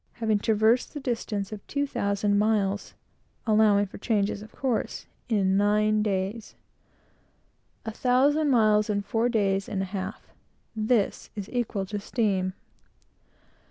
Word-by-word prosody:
having 220 -3 0
traversed 220 +6 +2
the - - -3
distance 225 -6 -3
of 210 -2 -6
two 285 0 -1
thousand 205 -5 0
miles, 205 -2 0 0.5
allowing 210 -2 +4
for 195 - -11
changes 205 -2 0
of 215 - -11
course, 255 -4 -2 0.2
in 195 -4 +2
nine 210 +1 +3
days. 205 +2 -2 1.3
A 225 - -3
thousand 275 +6 +2
miles 215 -4 +3
in 205 -1 0
four 225 +4 0
days 200 -2 0
and 195 -3 -1
a 190 +1 -8
half! 195 +1 -5 0.5
This 215 -1 0
is 200 -2 -6
equal 230 -5 -2
to 205 +2 -4
steam. 195 -4 0
210 Hz, 130 wpm, -26 LUFS, 200-225 Hz, 1.3 s, allowing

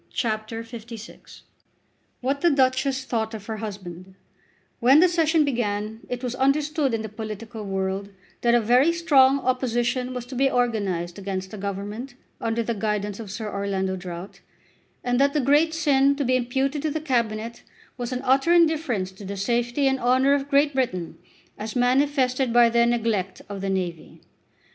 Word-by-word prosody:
CHAPTER 220 0 -2
LVI 230 -1 -11 0.8
What 275 +3 -1
the 345 - +5
Duchess 265 -1 +1
Thought 225 -3 -2
of 210 -2 -9
Her 220 0 -4
Husband 190 -3 -8 0.6
When 260 +5 +6
the 360 - +6
Session 325 -2 +2
began 220 -4 -2
it 250 0 -4
was 245 -1 -2
understood 275 0 +1
in 220 - -3
the - - -4
political 215 +1 -7
world 195 0 -2 0.3
that 235 0 +4
a 240 - +4
very 250 +8 +4
strong 275 -5 +4
opposition 250 0 0
was 245 -1 -4
to 255 +1 -9
be 270 +2 +3
organised 200 -9 -1
against 190 -1 -4
the 215 - -7
Government 205 +6 -5 0.2
under 230 0 -1
the 235 - -1
guidance 210 -1 -2
of 220 -3 -7
Sir 215 +2 -5
Orlando 195 -1 -1
Drought, 180 0 -8 0.6
and 245 0 +1
that 280 +1 +3
the 300 - +2
great 290 +4 +3
sin 280 -4 +3
to 285 -1 -2
be 255 +1 +2
imputed 265 +4 0
to 310 - -1
the 315 +2 -2
Cabinet 235 -5 -2 0.3
was 245 -1 -5
an 255 0 -2
utter 270 +5 +3
indifference 315 - +2
to 190 +2 -13
the 200 +1 -5
safety 240 +6 0
and 265 0 +1
honour 260 +3 +3
of 285 0 -1
Great 285 +1 +3
Britain, 185 -11 -2 0.4
as 215 +1 -5
manifested 255 0 +2
by 240 0 +6
their 235 0 +4
neglect 225 -5 -1
of 200 -1 -6
the 195 - -2
navy. 180 -4 -4
240 Hz, 170 wpm, -24 LUFS, 210-270 Hz, 0.8 s, When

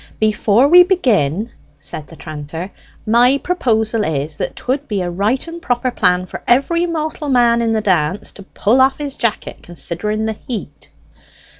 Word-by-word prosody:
"Before 215 +3 +3
we 355 +4 +8
begin," 230 - +1 0.3
said 150 - -7
the 165 - -13
tranter, 155 +4 -7 0.3
"my 240 +4 +4
proposal 225 -10 0
is, 150 -2 -2
that - - -4
'twould 270 +3 -3
be 200 -4 -1
a 175 - -3
right 210 - -1
and 335 +1 -8
proper 250 -3 -1
plan 180 -5 +1
for - - -8
every 335 +8 +2
mortal 310 -2 -3
man 240 -2 +3
in 230 -1 0
the 220 - +1
dance 185 -2 0
to - - -11
pull 215 +5 +1
off 265 +1 +3
his 285 -2 -5
jacket, 230 -3 -2
considering 175 +7 -3
the 220 -1 -3
heat." 210 - -6
220 Hz, 165 wpm, -17 LUFS, 185-265 Hz, 0.3 s, we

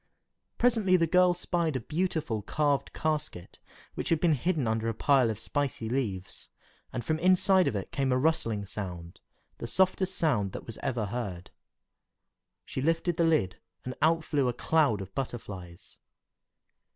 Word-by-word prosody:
Presently 220 -7 +3
the 165 - +3
girl 180 +2 +4
spied 170 -3 -1
a - - 0
beautiful 155 - -2
carved 145 +5 0
casket, 150 - -3 0.3
which - - -3
had 165 - +2
been 170 -1 +3
hidden 150 -2 0
under 110 +1 0
a 115 - -3
pile 135 -2 +3
of 110 - -3
spicy 125 -1 -2
leaves, 105 -8 -3 0.4
and 125 - -4
from 160 0 0
inside 185 0 +4
of 130 - -1
it 100 - -4
came 135 -2 0
a 125 - +3
rustling 115 -8 0
sound, 90 -4 -7 0.4
the - - -4
softest 190 +3 +2
sound 105 - +1
that - - -7
was 115 - -8
ever 125 -5 -1
heard. 100 -5 -5 1.1
She 130 - -4
lifted 165 +3 0
the 170 - +3
lid, 155 - +1 0.3
and 125 - -4
out 165 +1 +3
flew 145 -4 0
a 125 - 0
cloud 140 -5 +2
of 95 0 -9
butterflies. 95 -9 -7
140 Hz, 160 wpm, -29 LUFS, 110-165 Hz, 1.1 s, girl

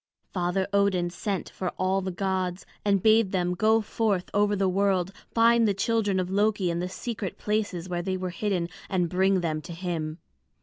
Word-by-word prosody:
Father 180 +1 0
Odin 190 -3 +2
sent 195 +2 -3
for 185 - -3
all 190 +1 +1
the 190 - -3
gods, 185 0 -2 0.2
and 200 -2 +2
bade 220 -2 +5
them 180 -2 0
go 220 +4 +3
forth 210 -3 -1
over 205 0 +3
the 195 -1 +1
world, 190 -1 +1 0.2
find 230 0 +5
the 200 - +1
children 205 -1 +1
of 185 0 -2
Loki 205 -2 +2
in 170 - -2
the 180 +1 -2
secret 215 -1 -5
places 205 -5 -2
where 175 -1 -2
they 185 +1 -2
were 185 -1 -3
hidden, 180 -1 -1 0.2
and 180 -3 +1
bring 190 +1 +2
them 155 -2 -1
to 170 +2 -8
him. 165 -3 -3
190 Hz, 185 wpm, -27 LUFS, 180-205 Hz, 0.2 s, bade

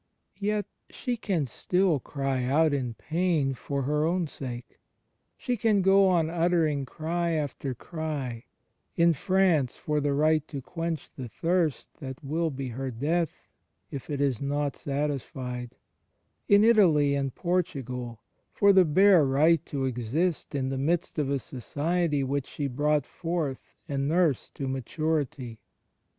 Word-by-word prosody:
Yet 210 0 0 0.2
she 245 - -3
can 190 -9 -1
still 180 - +1
cry 135 -1 -2
out 150 +4 +3
in 125 -5 -2
pain 160 -4 0
far 140 +2 -3
her 150 +3 +1
own 175 +2 +1
sake. 125 -5 -8 0.6
She 250 - -1
can 215 -3 +2
go 195 +1 +6
on 170 -4 +3
uttering 165 -4 +1
cry 170 +3 -2
after 145 -3 -3
cry 145 -6 -5 0.3
— - - -48
in 170 0 +4
France, 170 -5 +2
for 150 -1 -1
the 145 -1 +1
right 155 +1 +2
to 140 - -5
quench 165 +2 -4
the 125 -3 -7
thirst 165 +1 0
that 130 0 -7
will 160 +4 0
be 135 -2 -5
her 130 +3 -4
death 150 +7 0 0.6
if 140 - -7
it 145 -2 -2
is 135 -5 +1
not 145 0 -1
satisfied; 135 -4 -4 0.7
in 205 +1 +7
Italy 170 -11 +5
and 135 -2 -1
Portugal, 125 - -2 0.3
for 200 -1 +4
the 190 -1 +6
bare 185 +2 +6
right 145 +4 +3
to 135 -2 -2
exist 130 +8 -1
in 130 -1 -1
the 135 0 -2
midst 165 +3 0
of 145 -2 0
a 140 - +1
society 145 +5 -1
which 135 0 -2
she 145 - -4
brought 145 +2 +1
forth 165 -5 -3 0.3
and 140 -1 -1
nursed 165 -5 +1
to 135 - -3
maturity. 135 -2 -2
150 Hz, 145 wpm, -27 LUFS, 135-170 Hz, 0.7 s, in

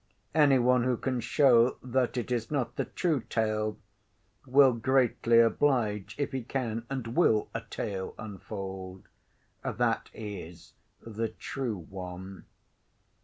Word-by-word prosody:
Any 145 -4 +5
one 125 0 +3
who 125 -1 +1
can 130 0 -1
show 120 -1 +4
that 130 0 0
it 120 0 -3
is 120 -2 -1
not 140 -4 -1
the - - -1
true 160 -7 0
tale, 110 -1 -1 0.7
will 135 0 +6
greatly 120 -1 +3
oblige, 115 -4 +2
if 145 - -1
he 130 - -2
can 115 -2 -3
and 125 -3 -4
will 110 -11 +3
a - - -3
tale 95 -2 -4
unfold, 95 -3 -7 0.6
that - - 0
is 90 -6 -8 0.3
the 115 0 -3
true 115 0 -4
one. 95 0 -8
115 Hz, 125 wpm, -29 LUFS, 105-130 Hz, 0.7 s, will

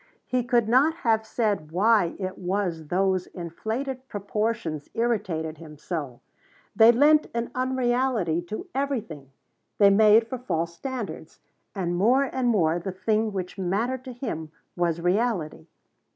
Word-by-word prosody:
He 250 -1 0
could 240 -2 +2
not 270 +7 +4
have 220 -1 +2
said 210 -10 -1
why 200 0 +3
it 185 -1 -4
was 180 -4 -2
those 185 +1 +1
inflated 230 - -5
proportions 205 - -3
irritated 190 -10 -1
him 155 -2 -11
so. 145 -7 -5 0.5
They 225 +2 +8
lent 295 +5 +4
an 235 0 -2
unreality 250 -8 0
to 215 - -5
everything. 225 - -3 0.5
They 200 -1 +6
made 215 +2 +6
for 255 +2 -5
false 170 -7 -2
standards. 255 +2 -6 0.4
And 175 -3 -1
more 240 +9 +4
and 260 -2 -1
more 175 -7 +2
the 190 +2 -4
thing 215 +4 0
which 185 -1 -5
mattered 225 +8 -1
to 260 - -6
him 190 - -5 0.2
was 170 -2 0
reality. 180 - -1
210 Hz, 135 wpm, -25 LUFS, 175-240 Hz, 0.5 s, They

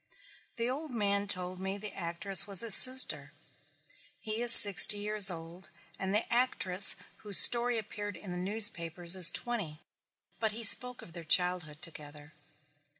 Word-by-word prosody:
The 235 -1 -5
old 290 +5 -8
man 205 -4 -5
told 185 -2 -5
me 190 +1 -7
the 210 +1 -10
actress 185 +3 -4
was 195 -3 -2
his 230 -3 0
sister. 260 +3 +1 0.9
He 220 0 -7
is 240 -1 +2
sixty 205 -2 +9
years 205 -1 +1
old 170 +2 -12 0.3
and 190 0 -6
the 210 +3 -2
actress 205 -6 -1 0.2
whose 205 -2 -2
story 240 0 +3
appeared 205 -2 -10
in 185 +1 -12
the 180 - -8
newspapers 180 -4 -1
is 185 -2 +6
twenty, 200 -11 -7 0.6
but 220 -2 -4
he 230 +2 -9
spoke 250 +3 +3
of 165 - -16
their 170 -1 -11
childhood 175 -2 -3
together. 150 -2 -11
200 Hz, 150 wpm, -27 LUFS, 175-220 Hz, 0.9 s, sixty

